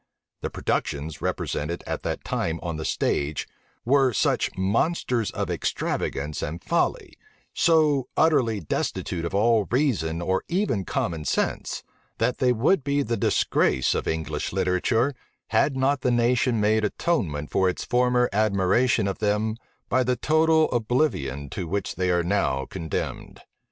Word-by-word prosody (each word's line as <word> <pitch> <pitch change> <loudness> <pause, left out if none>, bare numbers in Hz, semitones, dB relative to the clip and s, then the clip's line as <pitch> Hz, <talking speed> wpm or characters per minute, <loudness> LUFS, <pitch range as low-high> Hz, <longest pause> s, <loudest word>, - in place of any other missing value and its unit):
The - - -2
productions 75 +2 -2
represented 85 +4 -2
at - - -3
that - - -3
time 80 0 -2
on 85 -2 -3
the 80 - -4
stage 70 +1 -1 0.4
were 135 +1 +4
such - - +1
monsters 115 - 0
of - - -3
extravagance 75 +2 -2
and 80 +3 -4
folly, - - -1 0.3
so 150 -5 +3
utterly 125 -10 +3
destitute 85 +1 -2
of 85 - -3
all 110 0 +3
reason 110 - 0
or 95 +2 0
even 175 - 0
common 80 -3 -2
sense, 70 - -1 0.3
that 125 - 0
they 125 -1 +3
would 130 - +2
be 140 +1 +1
the 115 -1 -1
disgrace 65 - +2
of - - -2
English 80 0 -2
literature, 110 +9 +1 0.4
had 140 -2 +2
not 135 +1 +1
the 125 - +1
nation 120 0 +2
made 110 +1 +2
atonement 100 - -1
for 95 -1 +3
its 90 - -4
former 125 0 +2
admiration 110 +3 +2
of 95 - -3
them 105 +1 0 0.3
by 130 - +2
the 125 +1 +1
total 160 +2 +3
oblivion 110 - 0
to 90 0 -4
which 100 +3 -2
they 90 -1 -1
are 85 -1 +2
now 85 -8 0
condemned. 80 -1 -5
110 Hz, 145 wpm, -25 LUFS, 85-130 Hz, 0.4 s, were